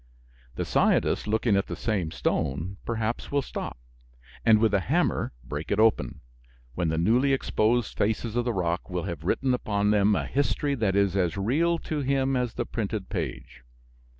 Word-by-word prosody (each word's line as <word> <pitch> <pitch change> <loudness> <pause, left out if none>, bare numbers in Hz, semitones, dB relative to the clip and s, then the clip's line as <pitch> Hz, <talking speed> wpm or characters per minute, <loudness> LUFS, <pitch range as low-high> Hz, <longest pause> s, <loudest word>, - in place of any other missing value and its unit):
The - - -2
scientist - - +2
looking 110 0 +2
at 100 - +1
the - - -4
same 100 -8 -1
stone 80 +5 -2
perhaps 115 0 -2
will 140 -1 +1
stop, - - -6 0.7
and 110 -2 +6
with 110 -1 +2
a 100 - +4
hammer 90 - 0
break 75 +5 -5
it 100 - +1
open, 105 - +2 0.5
when 85 +1 -1
the 80 - -1
newly 120 +11 +3
exposed 120 -3 +1
faces 110 +2 -1
of 120 - +2
the 120 - 0
rock 90 -3 -2
will 90 -2 -2
have 85 -4 -5
written 130 +9 +1
upon 105 -4 0
them 105 0 +4
a - - -1
history 145 +1 0
that 110 -7 0
is 100 -2 +2
as 90 -1 +1
real 155 +12 +2
to 155 -2 -4
him 135 -1 +1
as 125 -2 -1
the 120 - -2
printed 110 -4 -3
page. 65 - -5
105 Hz, 175 wpm, -27 LUFS, 95-120 Hz, 0.7 s, and